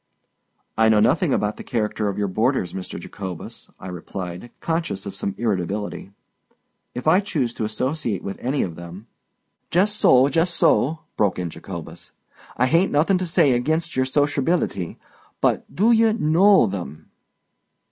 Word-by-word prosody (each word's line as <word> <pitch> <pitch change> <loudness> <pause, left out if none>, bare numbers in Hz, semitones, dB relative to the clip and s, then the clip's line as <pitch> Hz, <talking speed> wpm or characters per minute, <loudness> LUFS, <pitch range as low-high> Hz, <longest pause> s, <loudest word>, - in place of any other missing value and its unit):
"I 110 0 +5
know 110 -1 +5
nothing - - +3
about 105 0 0
the - - -8
character 105 -2 -1
of 100 - -4
your 105 -1 0
boarders, 110 -1 0
Mr. 95 -1 -6
Jacobus," 95 -4 -8
I - - -9
replied, 90 +3 -7
conscious 160 - -2
of 100 -1 -6
some 100 0 -3
irritability. 100 -2 -2 0.9
"If 125 +4 -5
I 170 +4 +6
choose 150 - -2
to 110 - -3
associate 125 - -2
with 100 - -6
any 135 +3 0
of 85 -3 -5
them——" 85 +5 -10 0.6
"Jess 195 +5 +2
so—jess 145 -2 +4
so!" 160 -1 +2 0.2
broke 100 -3 +1
in 90 -2 -3
Jacobus. 85 0 -9 0.4
"I 125 - +3
hain't 165 +8 +3
nothin' 170 +6 +3
to 185 - -2
say 145 -5 +3
ag'inst 160 +7 0
yer 130 - +2
sosherbil'ty. 145 - 0 0.4
But - - 0
do 215 +5 +4
ye 225 -1 +5
know 190 - +5
them?" 90 -7 -6
120 Hz, 150 wpm, -22 LUFS, 95-160 Hz, 0.9 s, I